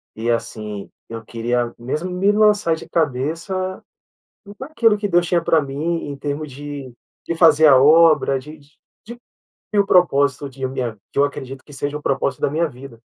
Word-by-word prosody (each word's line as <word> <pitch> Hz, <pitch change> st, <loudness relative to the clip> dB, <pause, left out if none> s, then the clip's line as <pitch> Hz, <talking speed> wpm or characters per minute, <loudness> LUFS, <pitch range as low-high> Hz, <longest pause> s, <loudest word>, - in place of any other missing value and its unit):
e, 115 Hz, +2 st, -3 dB
assim, 110 Hz, -3 st, -4 dB, 0.2 s
eu 115 Hz, 0 st, -7 dB
queria 120 Hz, +1 st, -2 dB
mesmo 150 Hz, +9 st, -4 dB
me 195 Hz, +3 st, +2 dB
lançar 210 Hz, -5 st, +3 dB
de -, -, -11 dB
cabeça 165 Hz, +6 st, -2 dB, 0.8 s
naquilo 245 Hz, -7 st, +1 dB
que 205 Hz, 0 st, -2 dB
Deus 175 Hz, -1 st, +2 dB
tinha 170 Hz, -1 st, +1 dB
pra 160 Hz, -2 st, +3 dB
mim, 150 Hz, +4 st, -3 dB
em 140 Hz, -, -6 dB
termos 145 Hz, +1 st, -4 dB
de 140 Hz, -2 st, -8 dB, 0.3 s
de 170 Hz, -, -2 dB
fazer 160 Hz, -2 st, +6 dB
a 135 Hz, -3 st, +7 dB
obra, 155 Hz, -2 st, +5 dB
de 150 Hz, +4 st, -12 dB
de 145 Hz, +1 st, -25 dB, 0.3 s
de 235 Hz, +2 st, -9 dB, 0.6 s
cumprir 205 Hz, -, +3 dB
o 200 Hz, -, +1 dB
propósito 140 Hz, -7 st, +2 dB
de 135 Hz, 0 st, -5 dB
minha 125 Hz, -4 st, -4 dB, 0.2 s
que -, -, -4 dB
eu 140 Hz, -, +5 dB
acredito 135 Hz, -2 st, -6 dB
que 145 Hz, -, -16 dB
seja 145 Hz, +2 st, -3 dB
o -, -, -16 dB
propósito 135 Hz, -1 st, -1 dB
da -, -, +1 dB
minha 165 Hz, +3 st, 0 dB
vida. 125 Hz, -2 st, -12 dB
145 Hz, 185 wpm, -20 LUFS, 130-170 Hz, 0.8 s, a